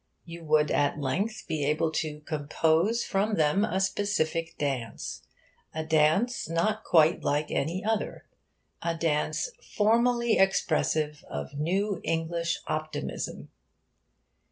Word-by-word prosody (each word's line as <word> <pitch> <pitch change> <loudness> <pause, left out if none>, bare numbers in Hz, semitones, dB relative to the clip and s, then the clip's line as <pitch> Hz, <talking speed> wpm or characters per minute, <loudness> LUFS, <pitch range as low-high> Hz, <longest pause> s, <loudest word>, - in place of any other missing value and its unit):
You 170 0 -9
would 150 -1 +3
at 145 0 +2
length 195 +11 -2
be 155 -3 -1
able 155 +3 +1
to 150 -1 -3
compose 160 +8 +1
from 205 +2 0
them 155 +5 +3
a 190 -3 0
specific 165 -4 -1
dance 130 - -3 0.5
a 160 0 -2
dance 160 +9 +2
not 215 +7 0
quite 160 0 +4
like 145 +1 0
any 175 +8 -1
other 220 -1 -2 0.6
a 170 -1 -1
dance 155 - 0
formally 235 +1 +2
expressive 155 -5 +1
of 75 - -5
new 190 +4 0
English 165 +1 -1
optimism. 155 - -4
165 Hz, 115 wpm, -28 LUFS, 150-195 Hz, 0.6 s, quite